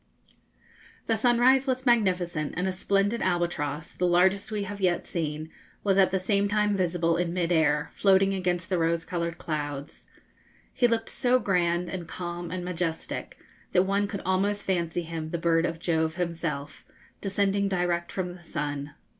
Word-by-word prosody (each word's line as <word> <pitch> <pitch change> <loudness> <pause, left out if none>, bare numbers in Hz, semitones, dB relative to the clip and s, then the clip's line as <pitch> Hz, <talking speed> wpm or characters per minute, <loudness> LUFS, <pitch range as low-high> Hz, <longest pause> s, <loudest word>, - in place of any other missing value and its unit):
The 225 - +2
sunrise 245 +4 +4
was 260 0 -1
magnificent, 180 - +1
and 180 +2 0
a - - +1
splendid 200 +4 0
albatross, 165 -4 -1
the 180 - 0
largest 185 +4 +3
we 210 -2 -2
have 200 0 -6
yet 180 -2 +1
seen, 155 -1 -3 0.3
was 195 -1 +3
at 190 -2 +6
the 190 - +1
same 200 +2 +1
time 210 0 +1
visible 170 -2 +1
in 175 0 -1
mid 175 -1 0
air, 150 -3 +2
floating 195 0 +4
against 180 -2 -1
the 180 - +2
rose 165 0 +1
coloured 170 -1 -3
clouds. 145 -3 -5 0.7
He 245 - +3
looked 230 -1 -1
so 250 0 +2
grand, 175 -5 +1
and 175 -3 -5
calm, 175 -1 -5
and 180 0 -4
majestic, 170 -2 -3 0.4
that 180 - +5
one 200 +1 +1
could 200 -1 -5
almost 200 +2 +1
fancy 175 -2 -1
him 160 -1 -5
the 170 - -2
bird 165 0 +2
of 165 - -4
Jove 160 -1 0
himself, 165 -5 -3 0.4
descending 200 0 +1
direct 175 -2 0
from 180 -2 -3
the 175 - -13
sun. 145 -3 -4
180 Hz, 165 wpm, -27 LUFS, 165-195 Hz, 0.7 s, at